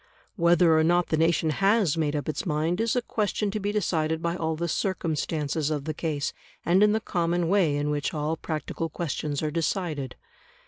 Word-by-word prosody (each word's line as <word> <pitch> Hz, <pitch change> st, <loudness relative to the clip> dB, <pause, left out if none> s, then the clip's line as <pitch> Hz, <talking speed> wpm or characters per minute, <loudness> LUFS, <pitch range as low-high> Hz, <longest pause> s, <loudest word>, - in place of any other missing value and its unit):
Whether 170 Hz, -2 st, +4 dB
or -, -, +3 dB
not 175 Hz, +2 st, +2 dB
the -, -, +2 dB
nation 160 Hz, 0 st, +2 dB
has 195 Hz, -1 st, +2 dB
made 155 Hz, -2 st, 0 dB
up 145 Hz, -, -3 dB
its 155 Hz, -, -2 dB
mind 165 Hz, +2 st, 0 dB
is 230 Hz, +1 st, +1 dB
a 245 Hz, -, +1 dB
question 210 Hz, -2 st, -1 dB
to 215 Hz, -, -2 dB
be 205 Hz, 0 st, -1 dB
decided 160 Hz, -6 st, 0 dB
by 170 Hz, +1 st, -1 dB
all 160 Hz, -2 st, -1 dB
the 170 Hz, +2 st, -2 dB
circumstances 155 Hz, -4 st, -1 dB
of 145 Hz, -2 st, -2 dB
the 155 Hz, -, -2 dB
case, 150 Hz, -2 st, -2 dB, 0.3 s
and 180 Hz, +3 st, +4 dB
in 210 Hz, 0 st, +6 dB
the 220 Hz, -, +2 dB
common 175 Hz, -3 st, 0 dB
way 180 Hz, -7 st, +3 dB
in 145 Hz, +1 st, -1 dB
which 145 Hz, -1 st, -1 dB
all 155 Hz, +1 st, -1 dB
practical 160 Hz, +1 st, -4 dB
questions 150 Hz, -2 st, -3 dB
are 155 Hz, -, -1 dB
decided. 160 Hz, -4 st, -2 dB
165 Hz, 195 wpm, -26 LUFS, 155-180 Hz, 0.3 s, in